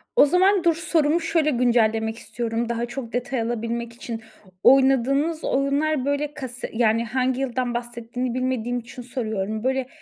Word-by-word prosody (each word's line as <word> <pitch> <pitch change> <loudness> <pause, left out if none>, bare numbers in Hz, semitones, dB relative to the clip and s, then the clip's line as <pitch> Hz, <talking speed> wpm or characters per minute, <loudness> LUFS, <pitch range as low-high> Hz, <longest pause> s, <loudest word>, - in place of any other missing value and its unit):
O - - +7
zaman 370 +4 +3
dur, 335 -1 +4
sorumu 325 -1 +2
şöyle 320 -1 +1
güncellemek 225 -2 +2
istiyorum, 230 +1 -3
daha 235 0 -1
çok 240 -1 -7
detay 250 0 -1
alabilmek 235 0 -3
için. 230 -1 -6 0.4
Oynadığınız 270 +4 +4
oyunlar 275 +1 +1
böyle 285 +1 -1
kase 260 -3 -6
yani, 230 0 +2
hangi 255 +2 0
yıldan 250 -2 -1
bahsettiğini 240 +1 -4
bilmediğim 250 -1 -1
için 245 +2 -10
soruyorum. 220 -3 -3
Böyle, 265 0 0
250 Hz, 145 wpm, -23 LUFS, 235-275 Hz, 0.4 s, O